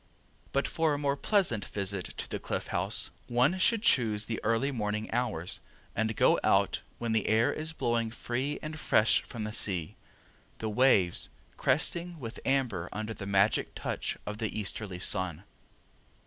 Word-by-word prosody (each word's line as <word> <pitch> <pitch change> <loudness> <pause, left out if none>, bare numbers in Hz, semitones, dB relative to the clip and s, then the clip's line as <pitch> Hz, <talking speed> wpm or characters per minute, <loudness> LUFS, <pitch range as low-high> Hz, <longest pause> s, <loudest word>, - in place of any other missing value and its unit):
But 140 - +1
for 160 -2 +1
a - - -2
most 140 -1 -1
pleasant 185 - +2
visit 100 -2 -3
to - - -6
the - - -4
Cliff - - -3
House 95 +2 0 0.2
one 130 +9 +2
should 225 +3 +3
choose 110 - +3
the 115 - -4
early 115 +6 +1
morning 105 -3 -3
hours, 115 -8 -1 0.4
and 110 0 0
go - - +4
out - - +3 0.2
when 115 -1 -2
the 110 -2 +1
air 110 +2 +3
is 155 +1 -4
blowing 120 -7 0
free 130 +5 -3
and 155 0 -5
fresh 110 -7 +3
from 115 -3 -7
the 105 0 -4
sea, 90 -8 +3 0.6
the 110 - -3
waves 105 -7 +3 0.3
cresting 170 +5 +1
with 115 -2 -7
amber 120 -11 0
under 110 +1 -4
the 100 -2 -7
magic 100 +1 +2
touch - - -3
of 105 0 -5
the 110 -1 -2
easterly 100 -2 -3
sun. 95 -2 0
110 Hz, 160 wpm, -30 LUFS, 105-135 Hz, 0.6 s, go